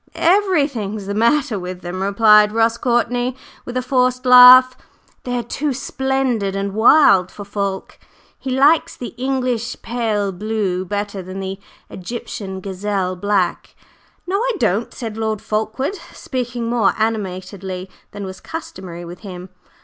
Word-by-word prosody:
"Everything's 285 - +1
the 200 - -3
matter 235 +1 +1
with 180 0 -7
them!" 180 +2 -5
replied 210 +1 +5
Ross 225 +1 +2
Courtney 245 +1 0 0.3
with 245 +1 -5
a 255 - -1
forced 255 -1 +1
laugh. 255 0 +9 0.5
"They 245 -1 -2
are 240 - -2
too 280 +4 -2
splendid 260 -6 -1
and 195 0 -3
wild 215 - +5
for 205 - -10
Fulke; 200 -1 -4 0.4
he 265 - -6
likes 280 +5 +3
the 245 - -6
English 250 -2 -2
pale 220 -4 -1
blue 195 -2 -2
better 205 +1 -4
than 185 +1 -8
the 190 0 -5 0.3
Egyptian 190 -1 -7
gazelle 190 -1 -2
black." 190 -1 -1 0.5
"No, 375 +2 -1
I - - 0
don't," 215 - 0
said 225 -3 -7
Lord 220 -1 -2
Fulkeward, 220 - -2 0.2
speaking 245 -2 -4
more 230 -3 +2
animatedly 190 -3 -3 0.2
than 205 -1 -7
was 190 0 -8
customary 185 - -8
with 175 +1 -10
him. 180 -1 -9
220 Hz, 140 wpm, -19 LUFS, 195-250 Hz, 0.5 s, laugh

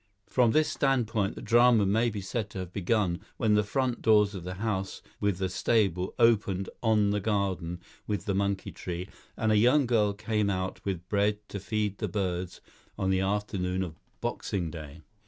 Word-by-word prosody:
From 125 -3 +3
this 155 +7 +3
standpoint 115 -7 0
the - - -8
drama 120 -2 +5
may 110 +5 +2
be 105 -2 -5
said 100 +2 -3
to - - -9
have 90 0 -8
begun 95 -2 0 0.2
when 110 -3 +2
the 105 - +5
front 125 +3 -1
doors 105 -2 +4
of 95 -4 -6
the 90 +1 -5
house 95 -2 -3 0.2
with 100 -3 +1
the 95 0 0
stable 95 -1 +1
opened 100 -5 +3
on 105 -3 +3
the 105 - +1
garden 95 -4 -1 0.3
with 105 -2 -2
the 100 - 0
monkey 100 -1 -1
tree, 90 0 -5 0.3
and 110 -1 +1
a 105 - +4
young 125 +6 +5
girl 110 -4 +2
came 105 0 -1
out 95 -1 -3
with 90 -3 -3
bread 105 +1 +1
to 100 - -5
feed 105 0 -2
the - - -1
birds 90 -3 -3 0.4
on 95 0 0
the 95 - +2
afternoon 95 -2 -1
of 85 -4 -6 0.3
Boxing 85 -5 -2
Day. 75 0 -9
100 Hz, 185 wpm, -29 LUFS, 95-110 Hz, 0.4 s, drama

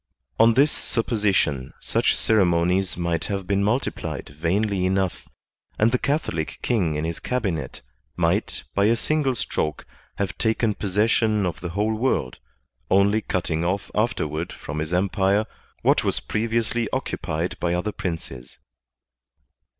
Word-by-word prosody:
On 115 0 +6
this 145 +4 +5
supposition 100 - 0
such - - +1
ceremonies 90 -3 +2
might 85 -1 -1
have 100 -2 -3
been 100 +1 +1
multiplied 120 +6 -1
vainly 90 +7 0
enough; 95 0 0 0.5
and 110 +2 +4
the 125 - +2
Catholic 140 - -1
king 95 -11 +1
in 75 +1 -1
his 85 0 -3
cabinet 95 - -2 0.3
might, - - 0
by 100 - +3
a 115 +2 +4
single 140 +1 +1
stroke, 75 - -2 0.3
have 100 -1 -2
taken 110 -1 +2
posses 105 +3 +1
sion 110 -3 +2
of 85 -3 -3
the 85 - -4
whole 105 +5 0
world, 110 - 0 0.5
only 100 +3 +4
cutting 85 -5 -1
oflE 95 +3 -1
afterward 85 -7 -1
from 75 +2 -6
his 80 +1 -3
empire 95 +3 +2 0.4
what - - +4
was - - +1
previously 115 +1 -1
occupied 85 +3 -2
by 85 0 0
other 90 +5 -1
princes. 80 -10 -6
100 Hz, 135 wpm, -24 LUFS, 85-110 Hz, 0.5 s, On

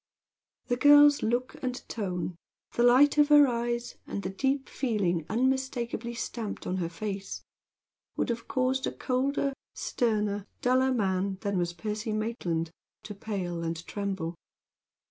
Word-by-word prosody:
The 245 - 0
girl's 290 +1 +7
look 240 +3 -1
and 255 -1 -2
tone 180 -5 -3 0.4
the - - 0
light 260 +5 +6
of 295 - +6
her 295 -1 +8
eyes, 240 0 -2
and 200 - -4
the 185 - -3
deep 270 +6 0
feeling 190 - -1
unmistakably 240 -1 -1
stamped 230 -2 -5
on 185 - -1
her 170 -3 -2
face, 195 +2 -5 0.7
would - - 0
have 230 -1 -3
caused 260 -1 0
a - - -1
colder, 275 +2 0 0.2
sterner, 215 -4 0
and 205 - -4
a 195 - -20 0.2
duller 255 +1 +3
man 195 -4 0
than 200 -3 0
was 175 0 -1
Percy 215 +4 -3
Maitland 180 -7 -2 0.3
to 210 - -7
pale 190 -4 -4
and 165 0 -4
tremble. 195 -5 -3
225 Hz, 145 wpm, -29 LUFS, 190-255 Hz, 0.7 s, her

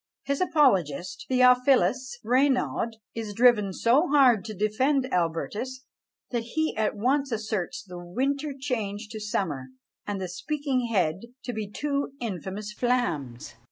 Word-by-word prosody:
His 280 +3 -1
apologist, 185 - +2
Theophilus 250 -1 +4
Raynaud, 255 -2 +2 0.2
is 220 -3 -5
driven 230 -4 +4
so 245 - +3
hard 260 - +5
to 215 -1 -6
defend 255 +7 +1
Albertus, 205 +10 -2 0.5
that 240 -2 0
he 315 +8 -2
at 215 -1 0
once 270 +6 +1
asserts 215 -4 -3
the 180 -3 -9
winter 275 +11 -1
changed 220 -5 -3
to 220 - -6
summer 175 -11 -2 0.4
and 205 -1 -2
the 185 - -3
speaking 265 - -2
head 185 -3 0 0.2
to 245 - -4
be 215 -2 -4
two 280 +4 -2
infamous 205 -1 -5
flams! 170 - -1
230 Hz, 130 wpm, -27 LUFS, 195-260 Hz, 0.5 s, hard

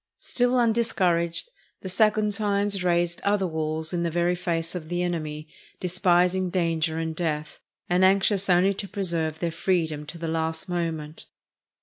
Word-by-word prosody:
Still 245 0 0
undiscouraged, 220 - +1 0.3
the - - -6
Saguntines 205 -1 +1
raised 175 -1 +1
other 200 -1 +1
walls 160 -1 -2
in 175 - 0
the 170 - 0
very 175 +2 +1
face 170 -2 -2
of 165 -4 -6
the 175 0 -1
enemy, 155 -3 -3 0.3
despising 180 0 +2
danger 165 -3 0
and 160 0 -3
death, 155 -3 -3 0.3
and 180 +1 +2
anxious 195 +1 +3
only 185 +2 +4
to 200 +1 -5
preserve 170 -6 -2
their 170 0 -2
freedom 160 -4 -1
to 170 - -7
the 165 0 -4
last 160 0 -2
moment. 165 -3 -4
175 Hz, 145 wpm, -25 LUFS, 160-190 Hz, 0.3 s, only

